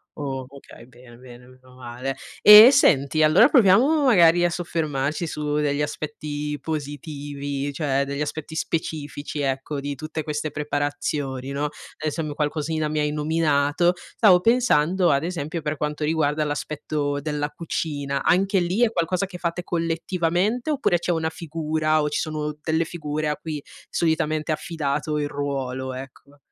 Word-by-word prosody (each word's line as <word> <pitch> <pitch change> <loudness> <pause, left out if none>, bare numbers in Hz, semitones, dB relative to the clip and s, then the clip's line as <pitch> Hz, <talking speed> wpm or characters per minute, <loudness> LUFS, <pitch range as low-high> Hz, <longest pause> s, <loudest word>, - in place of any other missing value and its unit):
O 135 -3 -4
okay 135 -3 -14
bene, 120 -1 -17
bene 125 -1 -14
meno 130 0 -19
male. 125 +2 -5 0.3
E 210 +3 +12
e - - +7
senti, 155 - +3
allora 155 +3 +6
proviamo, 255 +6 +5
magari, 175 -7 +5
a 175 - +3
soffermarci 155 -3 -2
su 150 -2 -3
degli 150 -1 0
aspetti 150 0 -4
positivi 145 -2 -5
cioè, 140 -1 0
degli 140 +1 -4
aspetti 155 +1 -5
specifici, 150 -2 -4
ecco, 135 +1 -2
di 140 0 -4
tutte 155 +3 -5
queste 150 0 -3
preparazioni, 145 -2 -3
no, 140 +1 -3
ad - - -1 0.3
esem 155 0 -3
qualcosina 155 +1 -1
mi 155 0 -1
hai 150 0 0
nominato, 155 +2 +1
stavo 180 +1 +3
pensando, 190 -6 +3
ad 140 +1 +2
esempio, 165 -2 -4
per 150 0 -2
quanto 150 0 -3
riguarda 150 -1 +1
l'aspetto 145 -1 -3
della 150 0 -2
cucina: 145 -4 -3
anche 195 +2 +3
lì 180 +6 -1
è 225 - +3
qualcosa 180 0 0
che 180 -2 -10
fate 170 0 -3
collettivamente 175 - -1
oppure, 280 - +1
c'è 175 - -1
una 160 -1 -1
figura 155 -1 -1
o 150 - 0
ci - - -1
sono 150 -1 -3
delle 160 +1 0
figure 155 -2 -3
a 150 - 0
cui 150 -1 -6 0.3
solitamente 160 -1 0
è 155 - +2
affidato 150 -2 -3
il 145 -1 -1
ruolo, 135 -2 -3
ecco? 135 +2 -11
150 Hz, 155 wpm, -23 LUFS, 145-165 Hz, 0.3 s, E